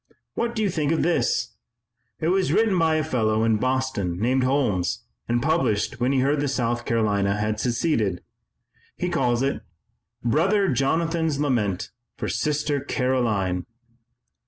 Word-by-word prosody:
What 235 0 -2
do 220 - 0
you 200 - +1
think 155 -3 0
of 165 - +1
this? 175 - +1 0.7
It 160 - 0
was 190 0 +2
written 220 -3 +3
by 160 -1 +3
a 155 - +1
fellow 110 -7 +1
in 110 -1 +3
Boston 130 -8 -1
named 130 +4 +2
Holmes 100 - 0 0.2
and 120 0 0
published 120 -9 0
when 125 +2 +1
he 135 -2 +2
heard 140 +2 +2
that 145 - 0
South 120 -3 -1
Carolina 100 -3 +1
had 105 0 -1
seceded. 115 - 0 0.7
He 180 - -1
calls 125 -5 +1
it: 135 -5 -1 0.6
'Brother 190 - +2
Jonathan's 160 +3 0
Lament 110 -10 0 0.3
for - - -3
Sister 145 +4 0
Caroline.'" 115 -10 0
130 Hz, 145 wpm, -24 LUFS, 110-155 Hz, 0.7 s, written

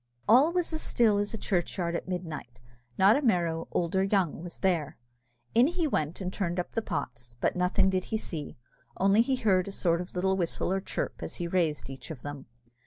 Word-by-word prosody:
All 260 +9 +6
was 350 -2 0
as 315 - -1
still 215 -4 +3
as 205 0 -1
a 225 - -4
churchyard 175 -3 -1
at - - -4
midnight 160 -9 -5 0.4
not 195 +3 +6
a 285 - +1
Merrow, 170 - +1
old 170 0 -1
or 190 - +4
young, 195 -6 +1
was 175 0 -8
there. 165 -6 0 0.6
In 240 +4 +6
he 345 0 -1
went 155 - -1
and 185 0 -3
turned 175 -2 -1
up 175 - -3
the 225 - -1
pots, 120 - -5
but - - +1
nothing 190 +2 +2
did 185 -1 -1
he 220 - -1
see, 155 -11 -5 0.4
only 195 +3 +4
he 260 +3 +1
heard 195 -7 +2
a - - -4
sort 170 -3 +1
of 180 - -7
a - - -21
little 190 +1 +1
whistle 180 0 0
or 195 - 0
chirp - - -3
as - - -5
he 175 - -3
raised 170 -4 0
each 135 -2 -8
of 145 -7 -8
them. 145 -1 -7
185 Hz, 220 wpm, -29 LUFS, 170-205 Hz, 0.6 s, All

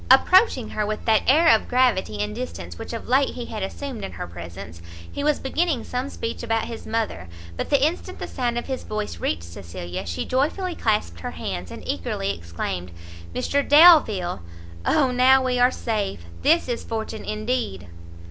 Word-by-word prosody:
Approaching 270 - +5
her 215 - -2
with 215 +1 -3
that 220 -1 +4
air 320 +6 +6
of - - -3
gravity 225 - +2
and 105 0 -2
distance 85 -2 -6
which - - -6
of 230 - -6
late 270 +2 +2
he 245 - -5
had 220 -3 -6
assumed 230 +3 -5
in - - -5
her - - -5
presence, 85 0 -9 0.3
he 285 - -4
was 300 0 +3
beginning 295 -1 -1
some 250 +2 -3
speech 230 -4 -5
about 225 -1 0
his 230 - -8
mother; 220 - -2 0.3
but - - -4
the 280 -1 +4
instant 325 +3 -3
the - - -5
sound 240 -2 -2
of 240 - -3
his 265 -1 -4
voice 215 -1 -4
reached 80 +2 -1
Cecilia, 90 +1 -7
she 85 -1 -3
joyfully 320 +8 0
clasped 210 - -1
her - - -4
hands, 90 0 -5
and - - -9
eagerly 95 +2 -2
exclaimed, 85 +2 -5 0.5
"Mr 285 - +1
Delvile! 285 - +6 0.5
O 270 -4 +3
now 260 +1 +5
we 250 -1 +1
are 245 0 +6
safe! 205 - -3 0.2
this 330 +2 +3
is 240 -2 -3
fortunate 220 -1 -5
indeed!" 215 - -2
225 Hz, 180 wpm, -24 LUFS, -, 0.5 s, air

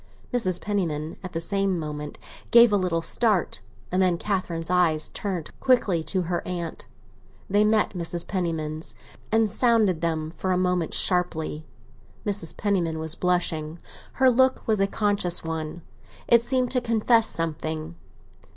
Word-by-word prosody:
Mrs. 185 -8 +1
Penniman 165 -7 -2
at 185 -2 -8
the 165 - -1
same 195 +1 0
moment 150 -2 -5 0.3
gave 235 -2 +7
a - - +5
little 180 -4 0
start, 210 - +1 0.3
and 185 +1 +2
then 180 -2 +3
Catherine's 175 -4 -2
eyes 165 -4 +2
turned 185 -6 -4
quickly 210 -10 +2
to 185 -2 0
her 175 +1 -2
aunt. 170 -2 -5 0.6
They 205 +2 +3
met 215 0 +2
Mrs. 170 -1 -3
Penniman's 160 -4 -3 0.4
and 225 0 +3
sounded 215 -6 +2
them 160 -1 -2
for 185 - -1
a 180 - +2
moment, 180 -2 0
sharply. 160 -4 0 0.6
Mrs. 200 -5 0
Penniman 180 -6 0
was 160 0 -1
blushing; 170 -3 -1 0.4
her 260 -1 +4
look 260 +2 +2
was 215 -2 +2
a 195 - +3
conscious 200 -4 +1
one; 160 0 -5 0.4
it 235 -1 +6
seemed 255 0 0
to 250 - +2
confess 230 -1 +3
something. 160 0 -3
180 Hz, 145 wpm, -25 LUFS, 165-210 Hz, 0.6 s, gave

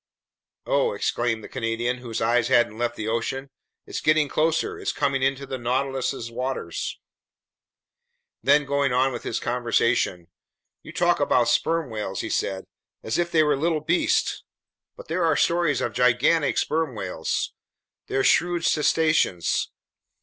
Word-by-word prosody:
"Oh!" - - +1
exclaimed 115 -2 -1
the - - -8
Canadian, 120 0 -2
whose 120 -3 -5
eyes 120 +1 +2
hadn't 120 -3 +2
left 120 0 -1
the 110 - -5
ocean. 130 +4 -2 0.3
"It's - - -5
getting 155 -1 +3
closer, 165 - 0
it's 405 - -2
coming 140 -2 0
into 135 +1 0
the 130 -1 -5
Nautilus's 130 0 -2
waters!" 125 -8 -4 1.4
Then, 145 +1 +4
going 140 -1 +1
on 130 +2 +2
with 120 - -5
his - - -3
conversation: 120 -7 0 0.5
"You - - -11
talk - - +2
about - - +2
sperm 165 -6 +1
whales," 105 -3 -4
he - - -5
said, 95 -1 -2 0.4
"as 110 - -1
if 175 0 0
they 160 -2 +4
were 150 -1 +2
little 160 +3 0
beasts! 165 +4 0 0.5
But - - -11
there 180 - -1
are 160 -3 +2
stories 170 -6 +2
of - - -2
gigantic 125 +5 +2
sperm 160 -5 0
whales. 90 -5 -3 0.5
They're 135 - 0
shrewd 175 -1 +2
cetaceans. 155 - +2
135 Hz, 145 wpm, -24 LUFS, 115-155 Hz, 1.4 s, Then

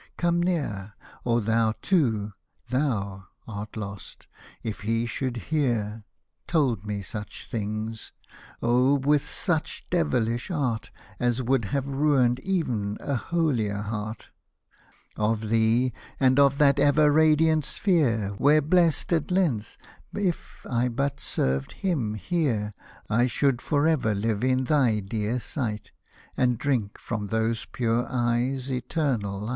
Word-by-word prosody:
come 175 0 +2
near, 110 - -2 0.3
Or 120 -1 +2
thou 110 0 +2
too, 110 - +1 0.4
thou 100 -9 -1 0.2
art 105 0 -6
lost, 100 -3 -7 0.4
if 110 -2 -4
he 115 +2 0
should 125 0 -3
hear 115 - -1 0.2
— - - -52
Told 130 - +1
me 100 -1 -3
such 105 0 -7
things 110 0 -4 0.2
— - - -21
oh! 125 +4 +4
with 145 +1 +2
such - - -2
devilish 115 - 0
art, 130 -10 -1 0.3
As 120 +1 +1
would 125 -2 +1
have 135 +7 -1
ruined 135 -3 +2
ev'n 125 - -1
a 140 - -3
holier 120 -7 0
heart 105 +1 -5 0.4
— - - -32
Of 110 0 0
thee, 115 +3 +3 0.3
and 130 0 +4
of 140 -1 +5
that 140 -1 +4
ever 145 +1 +5
radiant 155 0 +4
sphere, 135 - +1
Where 150 +2 +5
blessed 170 0 +2
at 160 -3 0
length, 165 - 0 0.4
if 190 -5 -3
I 120 0 +1
but 140 +3 -1
served 65 +1 -1
hiin 130 - 0
here, 115 - -1 0.3
I 120 +3 +3
should 130 0 +1
for 145 0 +1
ever 130 -10 +2
live 105 +2 -1
in 130 0 +2
thy 130 -6 +3
dear 110 +4 -2
sight, 115 -5 -4 0.4
And 125 -2 +2
drink 120 -6 -1
from 105 -3 -4
those 110 +1 -1
pure 120 0 0
eyes 125 +2 0
eternal 125 - -1
light. 105 - -4
120 Hz, 135 wpm, -26 LUFS, 110-145 Hz, 0.4 s, of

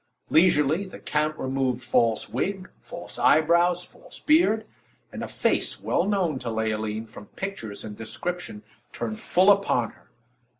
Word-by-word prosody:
Leisurely, 160 0 +4
the 185 - -10
count 150 +1 -1
removed 130 -2 -1
false 115 -2 +2
wig, 190 -1 -3
false - - -8
eyebrows, 170 +3 +4
false - - -13
beard; 300 -9 +3 0.4
and - - -7
a - - -4
face - - 0
well 180 - 0
known 180 -9 0
to 120 - -4
Leoline, 110 -1 -2
from 110 -2 -12
pictures 115 - -6
and 105 -1 -8
description, 115 -1 -5 0.3
turned 110 -2 -4
full 190 +3 +4
upon 195 - +2
her. - - -25
150 Hz, 140 wpm, -25 LUFS, 115-185 Hz, 0.4 s, Leisurely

